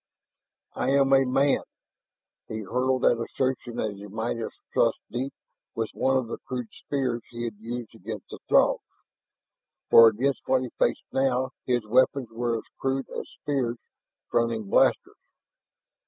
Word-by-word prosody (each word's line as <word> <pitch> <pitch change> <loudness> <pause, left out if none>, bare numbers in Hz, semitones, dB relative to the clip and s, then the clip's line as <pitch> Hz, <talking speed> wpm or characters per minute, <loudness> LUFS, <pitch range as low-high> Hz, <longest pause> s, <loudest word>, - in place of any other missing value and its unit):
"I - - -1
am 135 -1 +4
a 135 0 +6
man!" 135 +2 +3 0.9
he 110 0 -4
hurled 125 +5 0
that 115 -1 +4
assertion 130 -1 -2
as 105 -2 -2
he 100 +1 -9
might 110 +3 -3
have 115 - -3 0.2
thrust - - +3
deep 130 +3 -2 0.4
with 115 -1 -2
one 135 0 +2
of 130 - 0
the 115 - -5
crude 125 -3 -5
spears 130 -4 -2
he 120 0 -6
had 115 -2 -3
used 120 +1 -6
against 110 -1 -8
the - - -8
Throgs. - - +5 1.1
For 115 - +10
against 130 +6 +1
what 130 -1 +3
he 125 - -5
faced - - +2
now 130 -1 +1 0.2
his 120 -3 +1
weapons 130 +2 +3
were 115 0 -1
as - - -7 0.2
crude 135 0 -1
as - - -5
spears 130 -5 -2 0.5
fronting 115 -3 +1
blasters. - - +3
120 Hz, 155 wpm, -26 LUFS, 115-130 Hz, 1.1 s, For